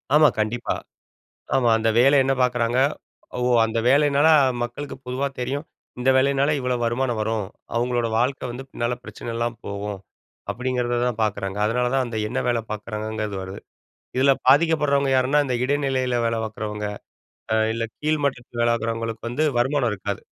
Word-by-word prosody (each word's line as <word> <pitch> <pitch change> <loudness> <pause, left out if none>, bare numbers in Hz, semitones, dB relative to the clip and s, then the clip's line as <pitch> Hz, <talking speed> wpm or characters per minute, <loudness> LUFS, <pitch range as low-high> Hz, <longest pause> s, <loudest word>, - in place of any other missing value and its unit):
ஆமா, 150 0 +7
கண்டிப்பா. 115 +3 -1 0.8
ஆமா. 125 -3 +3
அந்த 110 0 +1
வேலை 135 +3 +6
என்ன 135 - +2
பாக்குறாங்க? 125 0 +1 0.6
ஓ! - - -2 0.2
அந்த 115 +1 -1
வேலைனால 145 +2 +4 0.3
மக்களுக்கு 135 +5 -5
பொதுவா 130 +2 -1
தெரியும், 140 +5 -2 0.3
"இந்த 130 +2 +3
வேலைனால 140 +2 +3
இவ்வளோ 125 0 0
வருமானம் 120 0 0
வரும். 110 -2 -1 0.3
அவுங்களோட 120 -1 0
வாழ்க்கை 130 +2 0
வந்து 130 +3 -7
பின்னால 120 +1 -2
பிரச்சனை 115 - -7
இல்லாம 115 -1 -2
போகும்." 100 0 -4 0.5
அப்படிங்கிறதுதான் 125 -2 -1
பாக்குறாங்க. 100 -1 -3
அதனால 125 +2 +1
தான், 130 - +2
அந்த 115 -2 -4
என்ன 125 - -3
வேலை 120 -2 +1
பாக்குறாங்கங்கிறது 110 -1 -4
வருது. 95 +1 -7 0.6
இதில 135 +1 +5
பாதிக்கப்படுறவங்க 140 -2 +4
யாருன்னா, 130 +3 +3
இந்த 125 -2 -1
இடைநிலையில 130 -3 0
வேலை 115 0 -1
பாக்குறவங்க, 105 -1 -4 0.7
அ - - +3 0.2
இல்லை 115 0 -2
கீழ்மட்டத்தில 140 -6 -1
வேலை 120 0 +3
பாக்குறவங்களுக்கு 115 0 -3
வந்து 150 +6 0
வருமானம் 130 -1 +2
இருக்காது. 100 0 -4
120 Hz, 145 wpm, -23 LUFS, 115-135 Hz, 0.8 s, ஆமா